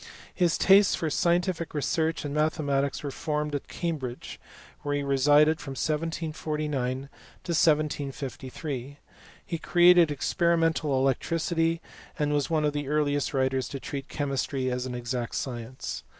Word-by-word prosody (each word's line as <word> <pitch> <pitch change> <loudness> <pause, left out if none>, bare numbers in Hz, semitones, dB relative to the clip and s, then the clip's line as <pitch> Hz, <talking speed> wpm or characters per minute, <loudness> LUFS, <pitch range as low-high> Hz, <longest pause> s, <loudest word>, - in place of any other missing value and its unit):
His 175 -3 +2
tastes 195 +1 +6
for 160 -2 -2
scientific 175 0 0
research 160 +2 0
and 145 - -3
mathematics 145 -3 0
were 140 - -3
formed 150 0 -2
at 145 - -3
Cambridge, 140 -8 -4 0.4
where 145 0 -2
he 145 - -1
resided 145 +4 +4
from 135 - -6
1749 155 -3 -2
to 130 - -3 0.5
1753. 145 -3 -1 0.5
Recreated 175 0 +5
experimental 165 0 +1
electricity, 165 +5 0 0.4
and 150 -1 0
was 145 -2 0
one 155 -2 +1
of 150 - +1
the 145 -1 -3
earliest 145 -1 0
writers 130 -1 +1
to 140 - -6
treat 135 0 -6
chemistry 135 -2 -1
as 125 +1 -2
an 125 - -5
exact 120 0 -3
science. 125 0 -5
150 Hz, 130 wpm, -27 LUFS, 135-160 Hz, 0.5 s, tastes